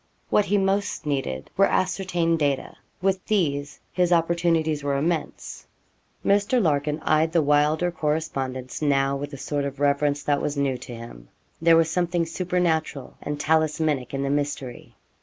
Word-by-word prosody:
What 210 - +4
he 205 +1 +2
most 195 -2 0
needed 135 - -3
were 195 +1 +5
ascertained 180 -3 0
data. 140 -3 -1 0.3
With 190 -1 +1
these 145 -9 0
his 180 -1 +1
opportunities 165 -3 +1
were 140 -1 0
immense. 160 +3 -3 0.6
Mr. 205 +5 +3
Larkin 150 -5 +1
eyed 155 +1 +2
the 170 - +4
Wylder 150 +4 +2
correspondence 150 -6 -3
now 140 -2 +2
with 145 +1 -5
a 140 - -7
sort 145 +2 -2
of 140 0 -5
reverence 145 0 +1
that 145 -1 +1
was 145 0 -2
new 135 -3 0
to 125 -1 -8
him. 85 - -11 0.3
There 165 0 +6
was 165 -1 +2
something 175 -1 0
supernatural 165 -5 -1
and 150 0 -4
talismanic 155 -3 +1
in 135 - -1
the 140 - -1
mystery. 140 -3 -3
155 Hz, 155 wpm, -24 LUFS, 140-170 Hz, 0.6 s, There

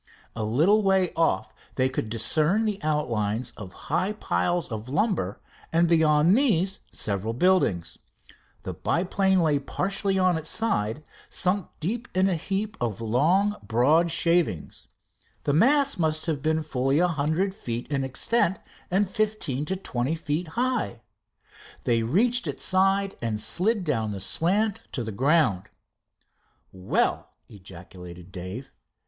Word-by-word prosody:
A 115 - -3
little 160 - +3
way 190 -2 +2
off 165 0 0 0.2
they 130 0 +2
could 130 -4 -3
discern 155 - +2
the 210 -2 -2
outlines 120 -6 -1
of 100 -4 -9
high 195 - -2
piles 165 - -1
of 110 +2 -5
lumber 150 - 0 0.3
and 170 +1 +3
beyond 160 +1 +4
these 195 - +2
several 105 +2 -2
buildings. 130 - +1 0.6
The - - -5
biplane 190 +1 +1
lay 150 -3 +2
partly 195 +6 -1
on 185 -3 +2
its 160 - -3
side, 155 - -1 0.3
sunk 185 0 -1
deep 230 +9 -3
in 185 +1 +3
a 190 - +1
heap 200 +6 -3
of 115 -5 -2
long, 165 - +2
broad 130 +11 +3
shavings. 165 - 0 0.6
The 145 - 0
mass 275 - +3
must 155 -1 0
have 155 -5 -2
been 155 +2 0
fully 135 -1 0
a 180 +2 +4
hundred 165 +4 0
feet 120 -9 -5
in 140 -1 0
extent 185 - +1 0.3
and 195 +2 +2
fifteen 200 - -1
to 190 - -2
twenty 135 -5 -2
feet 160 +2 -3
high. 235 - -2 0.8
They 115 -1 +2
reached 215 - +1
its 140 - -4
side 195 +1 +1
and 110 -2 -2
slid 200 - +1
down 110 -10 -1
the 100 - -5
slant 195 - 0
to 125 - -2
the 110 - -5
ground. 130 - +2 1.1
"Well!" 95 0 -1 0.2
ejaculated 90 -2 -12
Dave. 95 +9 -7
160 Hz, 140 wpm, -25 LUFS, 120-190 Hz, 1.1 s, beyond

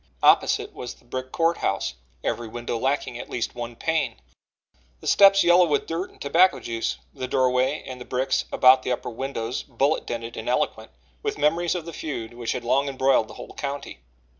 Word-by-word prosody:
Opposite - - +4
was 125 - -7
the - - -25
brick 130 +1 -5
Court 165 0 +2
House 95 - -1 0.3
every 120 - -2
window 120 +1 -4
lacking 125 0 -1
at - - -8
least 120 - -2
one 120 -1 -6
pane, 155 -4 0 0.8
the - - -14
steps 195 0 +6
yellow 175 +1 +6
with 145 -2 +1
dirt 170 +4 -3
and - - -22
tobacco 165 +1 +4
juice, 115 - -3 0.2
the 130 - -5
doorway 130 +2 +1
and 125 -1 -8
the - - -7
bricks 130 +1 0
about 130 0 +6
the 125 - -3
upper 125 - -3
windows 120 -1 -3
bullet 140 +4 0
dented 115 0 -5
and - - -4
eloquent - - -1 0.3
with - - -2
memories 165 +4 +2
of 170 -3 -4
the 170 - -7
feud 120 -8 -5
which 120 -1 -3
had 120 - -4
long 140 +3 +2
embroiled 130 -4 +2
the - - -12
whole - - -10
county. 140 0 -5
130 Hz, 190 wpm, -25 LUFS, 120-150 Hz, 0.8 s, steps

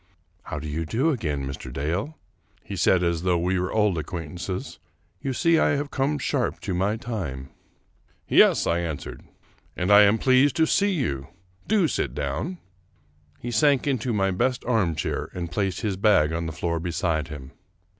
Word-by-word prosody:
" 85 +4 -40
How 80 - -5
do 80 +1 -5
you 75 +2 -2
do 125 - +1
again, 75 - -2
Mr. 65 -1 -7
Dale? 85 - -3 0.2
" - - -38
he 100 - -5
said 90 0 +3
as 85 -2 0
though 90 -1 +2
we 90 +2 0
were 90 0 -2
old 105 -6 +2
acquaintances; 90 +3 -5 0.2
" 85 +1 -41
you 135 - -2
see 165 +5 +3
I 145 - +3
have 145 0 -3
come 140 +2 0
sharp 140 -3 -1
to 95 - -3
my 95 +5 0
time." 85 - -5 0.4
" - - -40 0.3
Yes," - - +5
I 85 +1 +1
answered, 80 -4 -5 0.3
" - - -33
and 90 +2 0
I 100 0 +9
am 105 +2 +5
pleased 130 +3 +4
to 160 -1 +4
see 200 +5 +2
you; 70 - -2 0.4
do 205 -6 +3
sit 70 - -2
down." 70 - -3 0.8
He 120 - -6
sank 135 +4 +3
into 130 -3 0
my 95 -3 +1
best 125 +7 0
armchair, 95 -11 0
and 85 -2 -4
placed 95 -1 -1
his 105 -5 -2
bag 95 -7 +3
on 85 0 -2
the - - -3
floor 85 +1 -2
beside 85 -2 -1
him. 70 -4 -9
90 Hz, 190 wpm, -25 LUFS, 80-125 Hz, 0.8 s, I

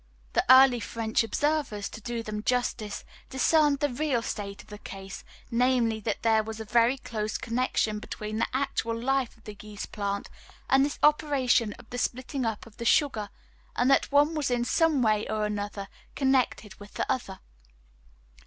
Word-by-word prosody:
The - - +3
early 260 -2 +8
French 225 -1 -1
observers, 275 -4 -1
to 220 - -10
do 235 +1 -4
them 210 -1 -4
justice, 240 -3 -2 0.2
discerned 290 +1 +3
the 290 - +2
real 265 -3 0
state 200 -2 -5
of - - -22
the 210 0 -9
case, 195 -2 -9 0.3
namely, 235 -2 +2
that 210 - -3
there 220 -1 +4
was 220 0 -7
a 220 - -5
very 235 +4 +3
close 215 -4 -3
connection 230 -3 -1
between 215 0 -5
the - - +1
actual 255 -4 -1
life 265 0 0
of 225 - -24
the 210 - -9
yeast 210 -1 -8
plant 200 -1 -3 0.4
and 270 0 +6
this 290 +1 -2
operation 275 -7 +3
of 245 - -16
the 245 - -3
splitting 255 +1 -2
up 220 -2 -4
of 225 -2 -17
the 235 - -5
sugar; 230 -8 +2 0.5
and 250 +2 +3
that 275 - +3
one 290 +3 +4
was 300 -4 -1
in 245 -1 0
some 315 -2 +2
way 215 -1 +2
or 215 -1 -1
other 205 -1 -5 0.3
connected 265 -6 0
with 205 0 -13
the - - -1
other. 240 -7 -2
235 Hz, 175 wpm, -27 LUFS, 215-265 Hz, 0.5 s, early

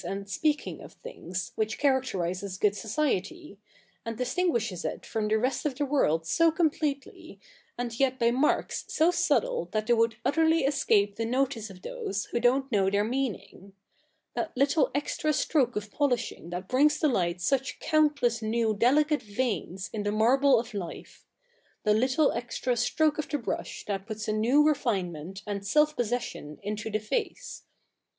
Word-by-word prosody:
hi - - -6
and 195 0 -5
speaking 300 +8 -1
of - - -12
things, 185 - -6
which 220 0 -1
characterises 200 -9 0
good 205 0 +2
society, 225 - -2 0.4
and 230 -1 -5
distinguishes 240 - -1
it - - -4
from 220 -2 -2
the 215 +1 +2
rest 255 +4 -1
of 290 -4 -1
the 290 - -1
world 165 - +1
so 330 - +4
completely, 310 -3 -2 0.4
and 240 -1 -4
yet 260 -1 +2
by 235 -2 +3
marks 265 +5 +1
so 325 +3 +3
subde - - +1
that 215 -1 0
they 240 - +3
would 230 -1 +2
utterly 320 +2 +3
escape 215 -8 +2
the 225 - -1
notice 245 -2 -1
of 185 -1 -13
those 200 +1 -4
who 235 - 0
don't 260 +3 +2
know 195 -3 +3
their 200 +1 +1
meaning 220 -5 -4 0.3
— - - -46
that 330 -5 -3
little 280 +2 +3
extra 300 +1 0
stroke 265 -3 +1
of 210 0 -4
polishing 245 - -1
that 180 +2 -5
brings 295 +5 +3
to 310 - +3
light 180 -9 0
such 270 +8 0
countless 290 -7 +2
new 220 0 +1
delicate 290 +8 +3
veins 205 -4 -3
in 215 - -2
the 205 0 -1
marble 255 +4 +4
of 225 -1 -6
life 190 -4 -8 0.3
— 485 - -38
the 210 - +3
little 260 +7 +3
extra 240 +1 -2
stroke 300 +6 +1
of 305 - -3
the 295 - 0
brush - - -5
that 195 -1 -4
puts 215 -2 -5
a 215 - 0
new 245 +8 +4
refinement, 195 - -1
and 200 -1 -4
self 300 +8 +3
possession, 235 -10 -3
into 210 +2 -4
the 215 0 -1
face. 420 - -4
235 Hz, 170 wpm, -28 LUFS, 205-285 Hz, 0.4 s, so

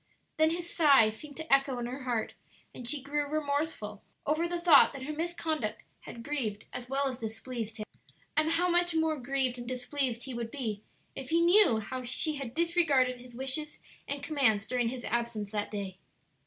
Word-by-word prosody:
Then 315 0 +5
his 340 +1 -3
sigh 275 -9 +6
seemed 285 +6 -9
to 320 -3 0
echo 275 -2 +4
in 240 - -3
her 255 +2 -6
heart, 235 -3 -1 0.4
and 245 -1 -7
she 290 -2 -1
grew 290 +1 -1
remorseful 285 -8 -2 0.2
over 310 +3 +1
the 345 0 -2
thought 335 -6 +7
that 270 -2 -7
her 300 +3 -4
misconduct 320 -7 -2 0.2
had 235 - -10
grieved 230 -7 -3
as 245 0 -6
well 275 +1 +1
as 255 -2 -4
displeased 225 0 -5
him. 215 - -5 0.5
And 315 +1 +3
how 350 +2 +2
much 350 -1 +3
more 320 -2 +1
grieved 255 -1 -1
and 240 - -7
displeased 255 -1 -2
he 265 - -6
would 235 -1 -4
be 225 -6 -3 0.3
if 265 - -6
he 330 +1 +3
knew 345 - +6
how 255 +4 -4
she 290 +5 0
had 260 -3 -6
disregarded 320 -7 +2
his 245 -1 -13
wishes 270 +4 -3 0.3
and 285 0 -3
commands 240 -10 +2
during 245 -1 0
his 250 0 -6
absence 235 -4 -2
that 210 -1 -2
day! 195 -3 -5
265 Hz, 190 wpm, -30 LUFS, 235-310 Hz, 0.5 s, thought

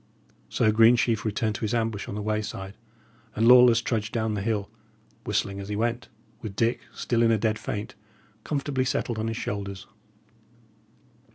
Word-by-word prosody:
So 110 - +2
Greensheve 115 0 +4
returned 110 0 0
to - - -7
his 110 +1 -1
ambush 110 -3 -2
on - - -5
the 105 - -4
wayside, 105 -2 -3 0.6
and 115 +2 +2
Lawless 125 -1 +7
trudged 110 -3 -2
down 110 -2 -1
the 105 - -2
hill, 105 -1 -1 0.6
whistling 100 0 -1
as 100 +1 -7
he 105 - -2
went, 120 +3 -2 0.3
with 105 -3 -7
Dick, 115 +3 +1
still 120 -1 -1
in 115 - +4
a 115 - +3
dead 110 0 0
faint, 110 +5 -5 0.5
comfortably 140 -3 -1
settled 120 -3 -2
on 110 - -2
his 115 0 -3
shoulders. 100 -3 -5
110 Hz, 165 wpm, -26 LUFS, 105-115 Hz, 0.6 s, Lawless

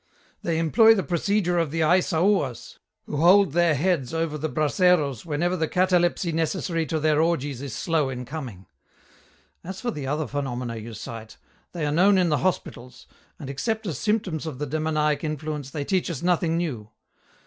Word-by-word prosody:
They 165 -2 -1
employ 220 +8 +5
the 195 - -1
procedure 180 0 0
of 165 -3 0
the 165 +2 -2
Aissaouas, 170 - +1 0.3
who 150 - -4
hold 180 +3 +5
their 170 0 +3
heads 160 -3 0
over 165 -2 -1
the 155 +1 -3
braseros 155 - +1
whenever 170 +4 0
the 160 -3 -1
catalepsy 180 -1 +1
necessary 165 0 -1
to 160 +3 -1
their 155 0 +2
orgies 145 -6 -1
is 140 -4 -6
slow 160 -5 0
in 125 -1 -5
coming. 125 - -7 1.0
As 190 +2 -7
for 240 - -2
the 145 -9 -5
other 150 +3 -1
phenomena 125 -5 -4
you 110 +1 -8
cite, 110 +1 -9 0.4
they 165 -4 -2
are 145 - 0
known 190 +6 +4
in 180 -2 +3
the 150 - +1
hospitals, 125 -9 -3 0.3
and 140 - -8
except 220 - -2
as 160 -9 -4
symptoms 190 -8 -1
of 150 -5 -5
the 150 - -3
demoniac 155 0 0
effluence 150 -2 -4
they 145 0 -4
teach 185 +1 0
us 165 -3 -5
nothing 170 -2 +1
new. 125 -12 -3
160 Hz, 175 wpm, -25 LUFS, 140-175 Hz, 1.0 s, employ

